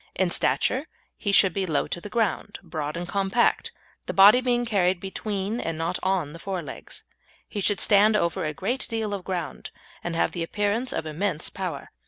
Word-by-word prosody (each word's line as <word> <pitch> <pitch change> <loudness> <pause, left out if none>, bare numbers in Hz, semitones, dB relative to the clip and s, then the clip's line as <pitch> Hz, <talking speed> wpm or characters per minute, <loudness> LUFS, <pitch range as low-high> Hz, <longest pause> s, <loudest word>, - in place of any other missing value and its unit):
In 185 -2 +1
stature 265 - +1 0.3
he 200 - -2
should 195 -2 +5
be 195 -1 -1
low 155 -3 +1
to 175 - -4
the 210 - -8
ground, 215 -2 -1
broad 155 -1 -4
and 175 0 -4
compact, 195 +5 +1 0.4
the - - -3
body 205 +6 +8
being 245 -1 +1
carried 190 -5 +2
between 200 +3 -3
and 165 -6 -3
not 165 +3 -1
on 185 -6 0
the 165 - -10
fore 185 -1 -4
legs. 140 - -9 0.4
He 205 - -4
should 205 +1 +1
stand 210 +1 +5
over 170 -5 0
a 155 - -1
great 200 - -2
deal 220 -2 -2
of 195 -2 -4
ground, 175 -7 -4 0.3
and 170 -1 -3
have - - +1
the 170 - -5
appearance 205 +8 -1
of - - -3
immense 155 +1 -1
power. - - -5
195 Hz, 195 wpm, -25 LUFS, 170-210 Hz, 0.4 s, body